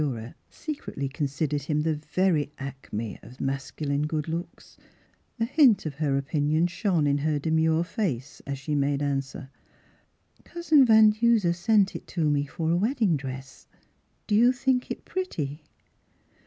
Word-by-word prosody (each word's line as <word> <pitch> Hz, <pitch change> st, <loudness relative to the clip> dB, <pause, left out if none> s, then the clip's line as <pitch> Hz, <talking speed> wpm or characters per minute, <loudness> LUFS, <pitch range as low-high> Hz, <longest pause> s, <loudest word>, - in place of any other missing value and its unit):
Miss 150 Hz, -, +1 dB
Philura 120 Hz, -2 st, -6 dB
se 310 Hz, -, -5 dB
cretly 140 Hz, -, -5 dB
considered 145 Hz, 0 st, -1 dB
him 150 Hz, +2 st, -1 dB
the 160 Hz, +1 st, +1 dB
very 150 Hz, 0 st, 0 dB
acme 130 Hz, -6 st, -6 dB
of 125 Hz, -, -14 dB
masculine 140 Hz, +2 st, -2 dB
good 155 Hz, -1 st, -2 dB
looks, 165 Hz, +2 st, -6 dB, 0.6 s
a 225 Hz, -, +2 dB
hint 255 Hz, -, +4 dB
of 155 Hz, -, -3 dB
her 140 Hz, -1 st, 0 dB
opinion 150 Hz, +3 st, +1 dB
shone 175 Hz, -2 st, 0 dB
in 145 Hz, 0 st, +2 dB
her 150 Hz, +1 st, 0 dB
demure 160 Hz, +2 st, +2 dB
face 145 Hz, -, -3 dB
as 140 Hz, 0 st, -3 dB
she 140 Hz, +3 st, -4 dB
made 145 Hz, 0 st, +1 dB
answer. 135 Hz, -1 st, -3 dB, 0.5 s
" -, -, -36 dB
Cousin 320 Hz, -5 st, +3 dB
Van 220 Hz, -1 st, +7 dB
Duser 215 Hz, -5 st, +2 dB
sent 200 Hz, +2 st, +2 dB
it -, -, -7 dB
to 165 Hz, -4 st, -1 dB
me 145 Hz, -1 st, +1 dB
for 160 Hz, +2 st, -2 dB
a -, -, +3 dB
wedding 215 Hz, -, +1 dB
dress; 135 Hz, -1 st, -8 dB, 0.6 s
do 210 Hz, -, -2 dB
you 235 Hz, +4 st, +6 dB
think 255 Hz, 0 st, 0 dB
it -, -, -6 dB
pretty? 155 Hz, -, -4 dB
155 Hz, 160 wpm, -26 LUFS, 140-195 Hz, 0.6 s, Van